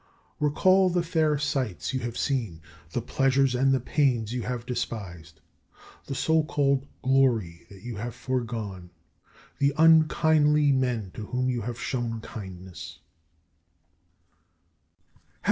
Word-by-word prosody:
Recall 185 +6 +4
the 175 -1 0
fair 160 -3 +1
sights 130 - -2
you 130 - 0
have 120 -1 -5
seen, 115 - -1 0.3
the 115 +7 -3
pleasures 135 0 +2
and 135 +2 +2
the 135 - +3
pains 125 -4 0
you 125 - -2
have 120 0 -4
despised, 85 - -5 0.7
the 135 - -4
so 160 +4 +2
called 140 -3 0 0.2
glory 120 -11 +1
that 100 0 -14
you 120 -3 -6
have 115 +3 -5
foregone, 115 -8 -4 0.7
the 140 0 +2
unkindly 155 -2 +5
men 125 -7 0
to 105 -2 -7
whom 130 +1 0
you 120 -2 -2
have 120 +2 -5
shown 120 -3 -2
kindness. 95 -5 -9
125 Hz, 125 wpm, -26 LUFS, 110-140 Hz, 0.7 s, unkindly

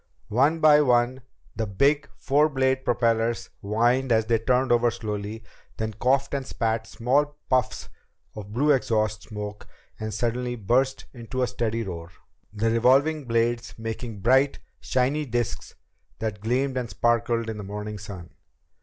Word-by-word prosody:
One 140 +9 +3
by 150 -1 +7
one 125 -1 +2 0.3
the 110 0 -2
big, 140 +8 +2
four 145 +3 +3
bladed 130 -1 +1
propellers 115 -1 0
whined 120 +5 +1
as 110 -1 +3
they 115 0 +2
turned 125 +3 +1
over 120 0 +4
slowly, 105 0 -5 0.3
then 110 0 -3
coughed 135 +6 +1
and 140 -1 -1
spat 115 -3 -2
small 145 +5 0
puffs 130 -2 +1 0.5
of 105 -1 -8
blue 140 +7 +2
exhaust 110 -6 +1
smoke 105 -1 -7 0.3
and 110 0 -4
suddenly 120 +3 -2
burst 125 +5 0
into 125 +1 -3
a - - +1
steady 115 -1 -2
roar, 85 -4 -7 0.4
the 110 +2 0
revolving 135 +6 +3
blades 115 0 0
making 115 -1 -5
bright, 130 +6 +3 0.2
shiny 130 +4 0
disks 120 -2 -3 0.4
that 110 -2 -4
gleamed 130 +4 0
and 125 -2 -2
sparkled 120 -1 +1
in 110 -1 -4
the - - -5
morning 105 +1 -6
sun. 100 -5 -9
120 Hz, 145 wpm, -25 LUFS, 110-130 Hz, 0.5 s, by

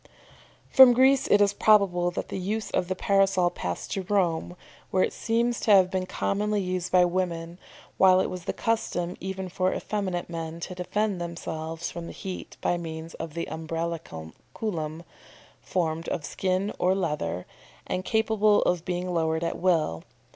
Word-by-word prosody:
"] - - -28
From 260 -2 +10
Greece 265 +2 +4
it 205 - +5
is 200 -1 +4
probable 195 -5 +4
that 175 - -5
the - - -4
use 210 +4 -3
of 180 - 0
the 185 - -2
Parasol 195 -2 +2
passed 90 -1 -5
to 195 - -1
Rome, 180 -3 0 0.3
where 185 - +2
it - - -1
seems 235 +1 0
to 220 - +1
have 185 -1 +5
been 185 -1 -1
commonly 210 +2 -1
used 185 -2 -2
by 180 -1 +6
women, 175 -1 -2 0.4
while 185 -1 +6
it - - +2
was 180 -1 -6
the - - 0
custom 180 -6 -1
even 190 0 -4
for 185 +1 0
effeminate 190 -4 -3
men 165 -1 -5
to 180 - -5
defend 190 +1 -1
themselves 165 -1 -5
from 170 -1 -7
the - - -8
heat 190 -3 -7
by 175 - +1
means 160 -1 -7
of 160 -1 -6
the 170 - -2
Umbraculum, 160 - -5 0.6
formed 165 -2 -2
of 150 - -3
skin 190 +2 -1
or 185 +1 +3
leather, 150 - -2 0.4
and 185 - -2
capable 215 -1 +3
of 175 -2 0
being 180 0 -3
lowered 160 -1 0
at 170 - -2
will. 160 - +1
180 Hz, 170 wpm, -26 LUFS, 165-195 Hz, 0.6 s, From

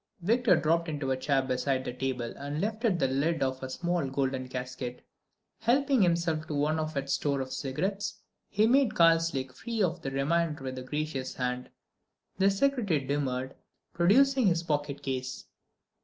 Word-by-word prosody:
Victor 235 +5 +4
dropped 165 +2 +1
into 145 -3 -2
a - - +2
chair 135 +1 +1
beside 130 +1 -1
the - - -3
table 125 -2 -3
and 145 +2 -4
lifted 215 0 0
the 135 - +2
lid 140 +4 +1
of 130 0 -2
a 130 - -5
small 170 0 -1
golden 130 -1 -1
casket. 125 -1 -6 0.5
Helping 260 +2 +3
himself 170 -3 +1
to 150 - -3
one 150 +2 +1
of 155 -1 -3
its 140 0 -1
store 140 -2 0
of 130 0 -4
cigarettes, 195 +10 -2 0.3
he 210 +1 +3
made 260 +1 +3
Karslake 165 -6 +3
free 225 - -2
of 175 -1 -1
the 135 - -3
remainder 150 +2 0
with 130 -1 -4
a - - -7
gracious 145 -1 -3
hand. 125 0 -2 0.7
The 195 +1 +5
secretary 205 - +1
demurred, 130 -1 -2 0.4
producing 250 +8 +4
his 170 -2 +2
pocket 145 -3 -2
case. 130 -1 -4
150 Hz, 165 wpm, -29 LUFS, 130-180 Hz, 0.7 s, The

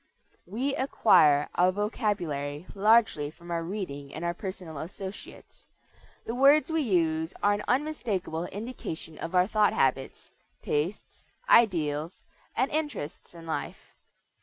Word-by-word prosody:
We 250 +9 -2
acquire 150 - +4
our 180 +1 +3
vocabulary 180 - -2
largely 210 -7 +3
from 170 +3 -12
our 170 -1 -1
reading 165 -7 -5
and 160 +3 -4
our 170 - 0
personal 180 -5 -7
associates. 190 +5 -9 0.6
The 230 - -3
words 280 +5 +5
we 320 0 +1
use 165 - 0
are 205 - +4
an 205 +1 -3
unmistakable 225 - -1
indication 200 -7 -7
of 165 +3 -5
our 180 0 +5
thought 210 0 +2
habits, 135 0 -1 0.3
tastes, 160 +8 -3 0.2
ideals, 165 - +2 0.3
and 260 +3 +1
interests 295 - -4
in 165 -1 -11
life. 160 - -5
185 Hz, 125 wpm, -28 LUFS, 160-220 Hz, 0.6 s, words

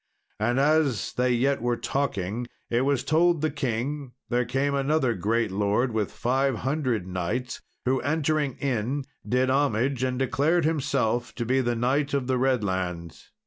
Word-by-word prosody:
And 120 +4 +1
as 145 -5 +2
they 125 0 +1
yet 130 +3 +1
were 120 0 0
talking, 120 -5 -2 0.2
it 120 +1 +2
was 140 -1 +1
told 160 +2 +3
the 155 -1 +1
king 135 0 -3 0.2
there 125 0 +1
came 135 +4 0
another 140 -2 +1
great 110 +2 0
lord 105 +5 +1
with 110 -2 -1
five 135 +2 +1
hundred 130 - 0
knights, 95 +8 -3 0.2
who, 130 +1 +2
entering 150 -1 0
in, 130 +1 -1 0.3
did 130 +1 +2
homage, 135 -1 +1
and 130 -1 0
declared 145 +6 +2
himself 125 -6 0
to 120 - -3
be 130 +3 +2
the 120 -1 0
Knight 140 +5 +1
of 135 -2 0
the 130 0 0
Redlands. 95 -10 -2
130 Hz, 155 wpm, -26 LUFS, 115-140 Hz, 0.3 s, told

